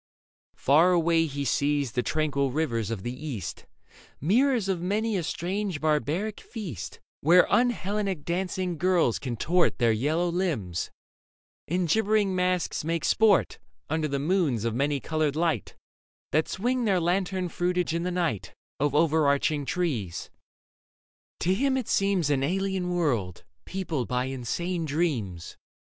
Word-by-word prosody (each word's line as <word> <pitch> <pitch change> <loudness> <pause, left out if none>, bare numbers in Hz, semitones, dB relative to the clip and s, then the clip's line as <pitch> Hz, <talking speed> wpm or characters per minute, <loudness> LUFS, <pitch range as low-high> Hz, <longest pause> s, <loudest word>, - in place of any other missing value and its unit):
Far 160 +7 +4
away 165 -1 +3
He 140 -1 -4
sees 145 -2 +1
the 125 - 0
tranquil 140 -1 0
rivers 125 -7 -1
of 110 -5 -4
the 120 - -3
East, 125 - -6 0.5
Mirrors 230 - +2
of 185 -3 -1
many 210 +4 0
a 185 - 0
strange 185 +2 -2
barbaric 155 +7 0
feast, 140 - -7 0.2
Where 175 +5 +6
un 245 +1 +5
Hellenic 200 -6 -2
dancing 180 -1 -2
girls 175 -9 +2
contort 150 +8 +1
Their 120 -3 +3
yellow 150 +10 +1
limbs, 145 - -2 0.8
and 175 +1 0
gibbering 210 +1 +2
masks 180 -3 0
make 165 0 -1
sport 215 -4 +3 0.3
Under 160 -1 +1
the 140 -1 -1
moons 145 - +1
of 115 - 0
many 140 +3 0
coloured 155 -1 -1
light 160 - -1 0.6
That 155 +1 +2
swing 245 +4 -1
their 195 -4 +3
lantern 185 +1 0
fruitage 175 0 -1
in 170 - -1
the 180 - -1
night 170 - -2 0.2
Of 145 0 +1
overarching 150 -2 +2
trees. 130 - -2 1.1
To 180 - +2
him 265 +6 +1
it 255 - -3
seems 195 -6 +1
An 135 -2 +2
alien 190 +4 -1
world, 125 - -1 0.2
peopled 165 -10 -3
by 125 0 0
insane 160 +7 -3
dreams. 135 - -2
165 Hz, 140 wpm, -27 LUFS, 140-185 Hz, 1.1 s, Where